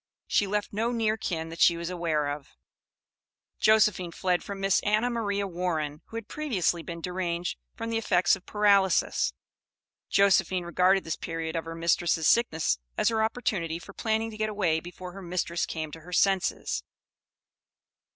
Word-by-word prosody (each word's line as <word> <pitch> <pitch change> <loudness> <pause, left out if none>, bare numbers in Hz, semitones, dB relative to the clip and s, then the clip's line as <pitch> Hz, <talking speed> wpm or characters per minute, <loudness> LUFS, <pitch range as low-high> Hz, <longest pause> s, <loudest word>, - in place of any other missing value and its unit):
She 205 - +2
left 210 +1 -2
no 225 +3 0
near 225 -2 +1
kin 165 -6 -3
that 165 - -9
she 170 - +5
was 170 +1 -4
aware 165 -4 0
of. 145 -1 -7 1.0
Josephine 210 -5 +4
fled 180 +1 0
from 200 -1 -6
Miss 195 0 +3
Anna 215 +4 +1
Maria 205 -4 -1
Warren, 165 -5 -2
who 225 - -7
had 230 -2 -6
previously 200 - 0
been 170 0 -7
deranged 180 -1 -2 0.2
from 230 - -4
the 225 - +1
effects 185 -5 +3
of 190 - -15
paralysis. 200 - +3 0.8
Josephine 190 -2 +3
regarded 185 +2 +3
this 160 - -3
period 165 0 -4
of 165 -1 -2
her 165 0 -6
mistress' 165 -1 +1
sickness 160 - +2 0.2
as - - +3
her 220 -1 +1
opportunity 210 -8 -1
for 200 +4 -12
planning 220 +1 -1
to 215 - -9
get 215 0 0
away 180 -7 +1
before 180 +2 -9
her 195 +2 -9
mistress 175 -1 -2
came 155 -2 -4
to 160 - -9
her 180 +3 -11
senses. 195 0 +1
185 Hz, 165 wpm, -28 LUFS, 170-210 Hz, 1.0 s, she